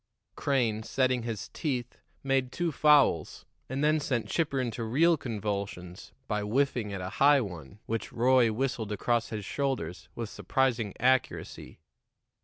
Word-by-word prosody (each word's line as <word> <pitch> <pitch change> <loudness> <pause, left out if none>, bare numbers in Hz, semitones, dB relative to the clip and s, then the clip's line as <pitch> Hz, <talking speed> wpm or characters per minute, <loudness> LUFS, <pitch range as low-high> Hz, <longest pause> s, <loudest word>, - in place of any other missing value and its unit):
Crane, 120 -6 0
setting 130 +2 +1
his 115 -3 -5
teeth, 130 -7 -3 0.2
made 135 -2 +1
two 175 +2 -1
fouls, 145 - +3 0.2
and 135 +3 -2
then 155 +1 +3
sent 125 -6 -1
Chipper 145 -5 0
into 120 -2 -2
real 155 +10 +3
convulsions 100 - -5 0.2
by 105 0 -1
whiffing 120 0 0
at 100 -2 -4
a 90 - -4
high 145 0 +7
one 90 - -8
which 115 0 -3
Roy 125 -1 +4
whistled 115 -2 -2
across 120 +3 0
his 105 -3 -5
shoulders 90 - -3
with 115 -1 -4
surprising 115 -3 -1
accuracy. 130 -9 0
120 Hz, 140 wpm, -29 LUFS, 105-135 Hz, 0.2 s, high